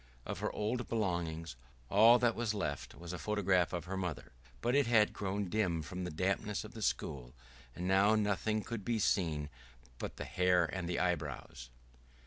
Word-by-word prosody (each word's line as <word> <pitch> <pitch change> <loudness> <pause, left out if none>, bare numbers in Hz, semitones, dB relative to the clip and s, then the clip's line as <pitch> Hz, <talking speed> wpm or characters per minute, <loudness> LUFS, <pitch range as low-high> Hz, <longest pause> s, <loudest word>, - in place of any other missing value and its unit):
Of - - -4
her - - -1
old 115 +3 -2
belongings, 85 - -2 0.3
all 115 - +7
that 120 -1 +2
was 115 -3 -1
left 75 -8 -3
was 85 +1 -7
a 90 - -5
photograph 100 -4 +2
of 90 -1 -3
her 95 +2 -4
mother, 90 -4 -4 0.3
but 120 - 0
it 140 -2 +4
had 110 -3 +4
grown 100 0 -2
dim 90 -5 0
from 90 +5 -5
the - - -3
dampness 95 +5 -1
of 105 +2 -10
the 110 - -8
school, 65 -8 -2 0.4
and 90 - -3
now 100 +3 +5
nothing 105 +1 0
could 115 -4 -5
be 115 +3 0
seen 80 -8 +1 0.5
but - - -5
the - - -4
hair 90 -1 +3
and 85 +2 -4
the 90 - -1
eyebrows. 75 -8 -2
95 Hz, 180 wpm, -34 LUFS, 85-105 Hz, 0.5 s, all